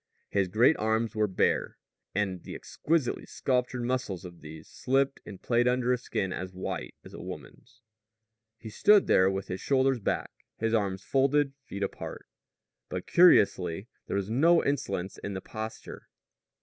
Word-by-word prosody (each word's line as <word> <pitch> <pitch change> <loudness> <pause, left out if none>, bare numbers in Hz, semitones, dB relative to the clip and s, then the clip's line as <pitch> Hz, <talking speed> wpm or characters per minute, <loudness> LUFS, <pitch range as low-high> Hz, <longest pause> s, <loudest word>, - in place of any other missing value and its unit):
His 100 -2 +1
great 115 - +4
arms 110 +1 0
were 110 -1 +1
bare; 95 - 0 0.4
and 95 -3 -1
the - - -8
exquisitely 155 -5 -1
sculptured 125 -1 -1
muscles 120 -8 -2
of 85 -1 -11
these 80 0 -11
slipped 135 +1 0
and 95 -3 -9
played 120 0 +2
under 125 0 +2
a - - +1
skin 95 -6 -2
as 90 0 -6
white 95 - -5
as - - -13
a - - -8
woman's. 125 -1 -11 0.7
He 110 -2 -9
stood 205 - +5
there 95 +1 +4
with 95 0 -3
his 95 - -5
shoulders 135 -2 +2
back, 100 - -2 0.3
his 115 0 -1
arms 95 -4 0
folded, 135 +1 +2
feet 100 +1 -5
apart. 100 - -5 0.6
But, 90 0 -4
curiously, 100 - +4 0.2
there - - -1
was 100 +2 -3
no 165 +8 +4
insolence 130 -10 -2
in 100 - -5
the - - -2
posture. 110 0 -8
110 Hz, 160 wpm, -29 LUFS, 95-130 Hz, 0.7 s, stood